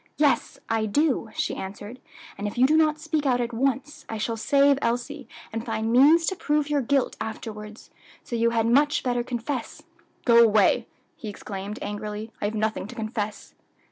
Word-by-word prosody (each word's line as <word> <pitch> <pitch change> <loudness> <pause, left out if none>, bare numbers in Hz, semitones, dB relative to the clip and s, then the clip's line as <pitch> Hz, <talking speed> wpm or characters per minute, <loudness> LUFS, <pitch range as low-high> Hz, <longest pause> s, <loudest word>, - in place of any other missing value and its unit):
"Yes, 290 -2 +2
I 225 -1 0
do," 265 0 +1
she - - -1
answered; 205 +5 -7 0.4
"and 205 - -4
if 205 - -6
you 250 - +6
do 305 +4 +4
not 310 -1 +3
speak 310 -2 -1
out 250 -2 +2
at 240 0 -2
once, 270 +4 -1
I 225 - -3
shall 225 +2 -2
save 280 +4 +3
Elsie, 245 +5 -2 0.3
and 225 0 -3
find 225 -1 -2
means 305 +7 +6
to 380 - 0
prove 295 -3 0
your 290 -1 +2
guilt 270 +1 +1
afterwards; 215 -1 -7 0.3
so 240 - -5
you 230 0 +3
had 230 -1 +1
much 285 +5 +3
better 245 -1 0
confess." 245 +1 -4 0.4
"Go 235 -1 +7
away," 220 +2 +3 0.3
he 215 - -7
exclaimed 200 +1 -6
angrily, 210 +1 -5
"I - - 0
have 210 +2 -2
nothing 215 -2 -1
to 245 - -10
confess." 215 -2 -4
235 Hz, 180 wpm, -25 LUFS, 220-280 Hz, 0.4 s, Go